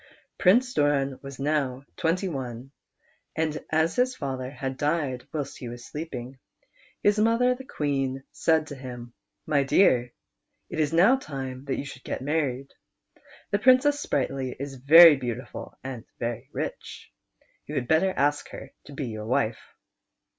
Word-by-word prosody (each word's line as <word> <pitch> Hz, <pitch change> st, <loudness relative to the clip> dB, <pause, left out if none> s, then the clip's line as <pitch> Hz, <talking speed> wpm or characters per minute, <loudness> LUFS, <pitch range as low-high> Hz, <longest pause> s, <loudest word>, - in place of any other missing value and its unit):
Prince 245 Hz, +7 st, +4 dB
Doran 140 Hz, -, +1 dB
was 140 Hz, -1 st, -9 dB
now 140 Hz, -2 st, -1 dB
twent\ 170 Hz, +3 st, 0 dB
one, 130 Hz, -4 st, -6 dB, 0.6 s
and 155 Hz, -1 st, -1 dB
as 160 Hz, +1 st, +1 dB
his 255 Hz, +1 st, +2 dB
father 130 Hz, -2 st, -4 dB
had 135 Hz, -1 st, -5 dB
died 145 Hz, -3 st, -1 dB
whilst 145 Hz, -3 st, -4 dB
he 120 Hz, -, -6 dB
was 120 Hz, 0 st, -9 dB
sleeping, 135 Hz, -5 st, -7 dB, 0.6 s
his 205 Hz, +1 st, +3 dB
mother 230 Hz, +3 st, +3 dB
the 260 Hz, +1 st, -10 dB
Queen 135 Hz, -, -2 dB
said 160 Hz, -1 st, +2 dB
to 145 Hz, -, -8 dB
him: 125 Hz, -2 st, -9 dB, 0.2 s
" -, -, -58 dB
My 145 Hz, -2 st, +2 dB
dear, 130 Hz, -4 st, +3 dB, 0.6 s
it -, -, -4 dB
is 150 Hz, -1 st, +1 dB
now 190 Hz, +11 st, +5 dB
time 135 Hz, -, -6 dB
that 135 Hz, -, -2 dB
you -, -, -4 dB
should 130 Hz, -2 st, -10 dB
get -, -, -4 dB
married. 140 Hz, -3 st, -1 dB, 0.8 s
The 205 Hz, -, +2 dB
Princess 260 Hz, +5 st, +5 dB
Sprightly 135 Hz, -, -2 dB
is 140 Hz, 0 st, -5 dB
very 155 Hz, +4 st, +9 dB
beautiful 125 Hz, -1 st, -6 dB
and 130 Hz, -4 st, -6 dB
very 120 Hz, -1 st, -4 dB
rich; -, -, -6 dB, 0.5 s
you 150 Hz, -, -6 dB
had 125 Hz, -3 st, -1 dB
better 160 Hz, +6 st, +3 dB
ask 145 Hz, +1 st, +1 dB
her 135 Hz, -, -10 dB
to 145 Hz, -, -11 dB
be 140 Hz, 0 st, -4 dB
your 110 Hz, -1 st, -6 dB
wife." 110 Hz, -2 st, 0 dB
140 Hz, 155 wpm, -26 LUFS, 130-160 Hz, 0.8 s, very